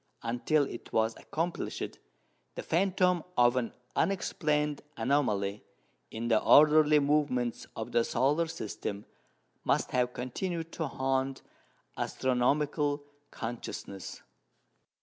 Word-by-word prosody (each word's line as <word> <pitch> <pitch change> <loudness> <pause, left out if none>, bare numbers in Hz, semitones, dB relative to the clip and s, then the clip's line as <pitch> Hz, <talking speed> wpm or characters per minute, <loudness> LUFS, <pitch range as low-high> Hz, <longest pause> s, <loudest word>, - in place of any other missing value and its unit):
Until 120 +6 +1
it 120 - -7
was 110 0 +1
accomplished, 165 +2 -4 0.6
the - - -5
phantom 180 -1 +2
of 120 0 +5
an 125 -3 -1 0.2
unexplained 150 -6 0 0.2
anomaly 110 -6 0 0.5
in 115 +1 -4
the 110 -2 +3
orderly 150 0 +7
movements 140 -5 +1
of 110 - -5
the 120 - +3
solar 150 +8 +1
system 105 -7 -5 0.6
must - - +1
have 125 -1 +1
continued 165 +7 -4
to 160 - -3
haunt 135 0 -1 0.5
astronomical 145 +3 +1 0.3
consciousness. 115 -4 -6
135 Hz, 100 wpm, -30 LUFS, 120-155 Hz, 0.6 s, orderly